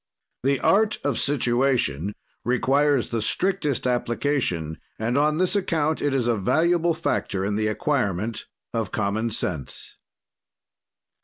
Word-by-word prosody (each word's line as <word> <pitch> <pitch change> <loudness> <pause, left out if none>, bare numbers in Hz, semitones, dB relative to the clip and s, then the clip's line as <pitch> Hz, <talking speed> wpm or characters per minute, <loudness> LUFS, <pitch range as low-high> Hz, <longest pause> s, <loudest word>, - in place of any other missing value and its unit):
"The 135 +1 +1
art 215 +1 +3
of 145 - 0
situation 120 - +1 0.3
requires 135 +2 +2
the 115 -2 0
strictest 150 - 0
application 120 - -1 0.2
and 115 +3 -1
on 150 +2 +3
this 185 +2 +1
account 160 -5 0
it 145 - +1
is 130 -3 0
a 120 - +3
valuable 170 - +2
factor 95 -10 -1
in 100 0 -1
the 110 0 0
acquirement 110 - -1 0.3
of 115 -3 -2
common 110 +2 -1
sense. 85 - -5
125 Hz, 125 wpm, -24 LUFS, 110-150 Hz, 0.3 s, art